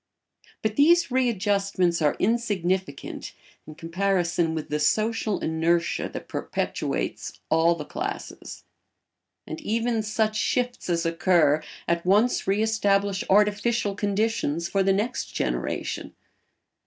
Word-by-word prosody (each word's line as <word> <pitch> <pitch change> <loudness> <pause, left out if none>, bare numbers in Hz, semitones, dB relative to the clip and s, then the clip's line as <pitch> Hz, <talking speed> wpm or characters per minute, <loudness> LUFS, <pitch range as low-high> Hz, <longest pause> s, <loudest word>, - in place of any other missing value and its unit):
But 215 0 -1
these 335 +1 +5
readjustments 200 -7 +1
are 150 -2 +2
insignificant 190 -8 -1 0.3
in 155 - -10
comparison 170 -1 0
with 155 - -5
the 150 - -1
social 215 +6 +1
inertia 165 +1 0
that - - -8
perpetuates - - -3
all 165 +1 +4
the 150 -3 -7
classes, 385 - -6 0.8
and 325 - -7
even 230 -2 0
such 215 0 0
shifts 245 0 -1
as 170 -1 0
occur 165 -3 +3 0.3
at 170 0 0
once 210 +7 +2
re 200 +3 +2
establish 200 -3 +1
artificial 210 +2 +2
conditions 200 -5 -1
for 195 +1 0
the 195 0 +3
next 210 +6 -2
generation. - - -3
200 Hz, 115 wpm, -25 LUFS, 170-220 Hz, 0.8 s, these